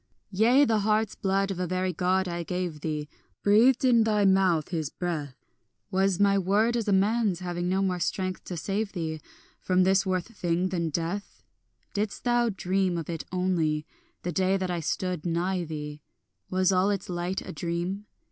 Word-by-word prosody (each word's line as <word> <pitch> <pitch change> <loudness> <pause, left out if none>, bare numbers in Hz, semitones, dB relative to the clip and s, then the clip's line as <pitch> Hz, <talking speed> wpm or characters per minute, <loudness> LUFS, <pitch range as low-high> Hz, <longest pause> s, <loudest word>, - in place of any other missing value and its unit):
Yea, 235 +8 +5
the 225 -4 +2
heart's 215 +1 +1
blood 195 0 0
of 185 - -4
a 180 - -1
very 185 +1 -1
God 185 +2 +1
I 175 0 -3
gave 175 -3 -3
thee, 150 -2 -3 0.4
Breathed 235 +6 +5
in 235 -3 +5
thy 210 -2 +2
mouth 190 -5 +3
his 160 -5 -2
breath; 155 -7 -4 0.6
Was 190 -1 +2
my 200 -1 +4
word 210 +5 +2
as 230 -3 -1
a - - +2
man's, 200 -1 +2
having 175 0 -2
no 190 +1 +1
more 180 -2 0
strength 185 +2 -2
to 180 - -5
save 200 +4 -2
thee 160 -4 -3 0.4
From 185 0 +2
this 190 +1 +4
worse 185 -2 0
thing 180 -4 -1
than 170 -3 -1
death? 170 +6 -4 0.5
Didst 205 0 -2
thou 240 -1 +2
dream 190 -2 0
of 165 0 -4
it 165 -2 -5
only, 170 -5 0 0.4
the 175 - -2
day 190 +3 +2
that 185 -1 -2
I 175 - -1
stood 180 +1 -2
nigh 175 +1 -1
thee, 150 -1 -6 0.5
Was 185 0 +2
all 185 +1 +3
its 200 -2 -2
light 180 +1 -2
a - - -7
dream? 175 +5 -3
185 Hz, 180 wpm, -27 LUFS, 175-200 Hz, 0.6 s, Yea